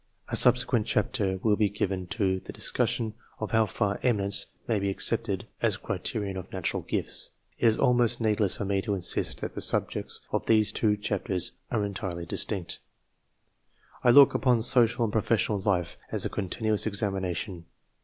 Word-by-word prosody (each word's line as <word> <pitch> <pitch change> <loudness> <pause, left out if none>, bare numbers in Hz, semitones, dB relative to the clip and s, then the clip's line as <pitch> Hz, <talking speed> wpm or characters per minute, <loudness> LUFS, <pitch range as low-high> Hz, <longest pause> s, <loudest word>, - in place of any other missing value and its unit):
A - - -1
subsequent 125 -2 +4
chapter 100 -3 0
will 105 -2 +3
be 105 -1 +2
given 95 -2 -2
to 95 -1 0
the - - -9
discussion 110 -2 -1 0.2
of 110 - -5
how 110 -1 +3
far 105 -1 -1
eminence" 100 -5 +1 0.2
may 110 -3 +1
be 100 0 -1
accepted 95 - 0 0.2
as - - +2
a - - -10
criterion 100 -3 -3
of 95 0 -8
natural 95 -3 -2
ifts. - - 0 0.3
It 120 - +4
is 110 - +4
almost 120 -2 +3
needless 105 -3 +1
for 100 - -3
me 100 0 0
to 100 +1 -1
insist 95 - -1
that - - -4
the - - -4
sub - - +4
jects - - -5
of - - -2
these 110 -2 +4
two 105 -1 +1
chapters 100 -3 -2 0.2
are 105 - 0
entirely 95 -4 -5
distinct. 90 +1 -1 1.2
I 125 - +5
look 140 +2 +8
upon 125 -4 +2
social 120 -1 +3
and 105 - -4
professional 110 -1 +1
life 95 -3 -1
as - - -2
a - - -1
continuous 105 +2 -1
examination. 95 -3 -2
105 Hz, 175 wpm, -27 LUFS, 95-110 Hz, 1.2 s, look